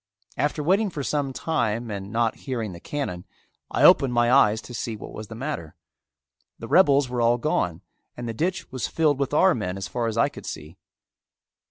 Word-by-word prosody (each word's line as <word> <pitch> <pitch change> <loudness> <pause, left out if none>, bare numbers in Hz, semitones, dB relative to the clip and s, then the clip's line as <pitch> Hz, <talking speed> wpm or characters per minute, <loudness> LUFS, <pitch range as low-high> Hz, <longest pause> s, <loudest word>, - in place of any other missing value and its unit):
After 150 +1 -1
waiting 195 +6 +2
for 150 -5 -5
some 140 -1 -1
time 120 -6 -1
and 100 0 -6
not 115 0 +1
hearing 115 -6 -2
the 85 - -9
cannon, 90 -9 -4 0.5
I - - 0
opened 125 -3 +6
my 120 0 +3
eyes 110 -5 +5
to 125 - -10
see 115 -1 -3
what 105 - -9
was 110 0 -7
the 110 - -9
matter. 115 - -5 0.8
The 115 - -8
rebels 145 -4 +5
were 125 -1 -2
all 120 +1 +4
gone 95 - -1 0.3
and 120 0 -5
the 115 - -3
ditch 175 +9 -2
was 130 -2 -2
filled 150 -4 +1
with 140 -1 -1
our 185 +5 +5
men 95 -5 -3
as 95 -1 -4
far 115 +5 -2
as 115 0 -3
I 130 - +4
could 145 - -10
see. 75 +3 -7
120 Hz, 200 wpm, -25 LUFS, 110-145 Hz, 0.8 s, opened